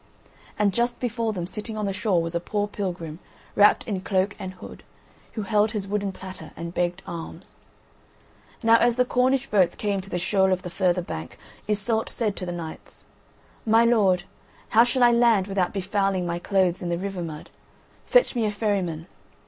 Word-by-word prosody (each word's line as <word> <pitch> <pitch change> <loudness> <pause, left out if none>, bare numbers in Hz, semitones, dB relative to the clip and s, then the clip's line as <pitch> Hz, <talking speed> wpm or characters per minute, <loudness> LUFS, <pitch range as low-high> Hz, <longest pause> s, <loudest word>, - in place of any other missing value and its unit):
And 205 -2 +2
just 240 +2 0
before 230 -2 -1
them, 180 -5 -4
sitting 210 +4 -6
on 210 - -1
the 195 - -1
shore, 190 -4 +1
was 165 0 -4
a 170 - 0
poor 205 +4 -2
pilgrim, 175 -6 -5 0.4
wrapped 205 0 +5
in 195 -4 -2
cloak 190 +1 0
and 185 0 -6
hood, - - -11 0.5
who 215 - -3
held 210 +1 +2
his 200 -3 -3
wooden 200 0 -1
platter 185 -4 -9
and 170 0 -6
begged 175 +1 -1
alms. 170 +1 -9 1.0
Now 230 0 +6
as 240 0 +3
the 250 0 +3
Cornish 255 +2 +2
boats 185 -4 +3
came 200 -2 -1
to 195 - -10
the 180 - -2
shoal 190 +1 +2
of 185 0 0
the 180 - -6
further 180 -1 +1
bank, 80 - -7 0.3
Iseult 215 +2 0
said 215 -4 -1
to 185 - -3
the - - -2
knights: 165 -2 -8 0.6
"My 225 +1 +4
lords, 200 -6 +3 0.5
how 230 - +6
shall 250 +1 +1
I 240 - +7
land 235 -5 +4
without 195 -2 0
befouling 195 -1 0
my 170 0 -2
clothes 185 -1 +1
in 175 - -3
the 170 - 0
river 195 0 -4
mud? 155 -3 -7 0.6
Fetch - - +4
me 230 -2 +1
a - - -1
ferryman." 195 -7 -1
195 Hz, 190 wpm, -25 LUFS, 180-220 Hz, 1.0 s, I